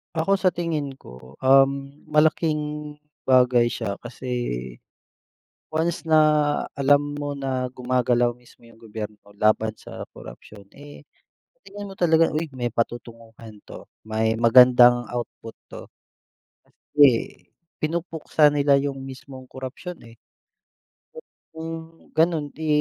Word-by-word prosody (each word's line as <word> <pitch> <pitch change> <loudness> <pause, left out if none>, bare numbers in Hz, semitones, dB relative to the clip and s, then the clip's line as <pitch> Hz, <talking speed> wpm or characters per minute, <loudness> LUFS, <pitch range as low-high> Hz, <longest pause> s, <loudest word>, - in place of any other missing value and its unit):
Ako, 180 +5 +1
sa 185 -3 +1
tingin 155 -5 -3
ko, 65 - -15
um, 135 +1 +4 0.2
malaking 150 -1 0 0.3
bagay 125 -2 +4
siya 110 -4 -4
kasi 120 - -5 0.9
once 165 +2 -1
na 160 -1 +4 0.6
alam 145 +1 +2
mo 145 0 -4
na 130 -2 -2
gumagalaw 125 -1 0
mismo 120 -1 -21
yung 115 - -18
gobyerno 110 -1 -8 0.2
laban 110 +1 +2
sa - - -9
korapsiyon, 100 -2 -13
eh, 145 +1 -13 0.5
sa - - -41
tingin 205 +1 -9
mo - - -11
talaga, 165 -1 +4
"Uy, 160 +2 -1
may 120 -1 -2
patutunguhan 115 -2 -6
'to. - - -12 0.2
May 110 +1 0
magandang 120 +1 +6
output 120 -1 -7 0.2
'to." - - -10 0.8
Kasi 145 -1 +3 0.7
pinupuksa 160 -2 +1
nila 140 -1 +3
yung 135 -1 -4
mismong 130 -1 -11
korapsiyon, 130 +8 -8
eh. - - -19 1.4
Kung 160 0 -6 0.2
ganun, 160 -2 +1
'di 160 +2 -7
135 Hz, 115 wpm, -23 LUFS, 120-155 Hz, 1.4 s, magandang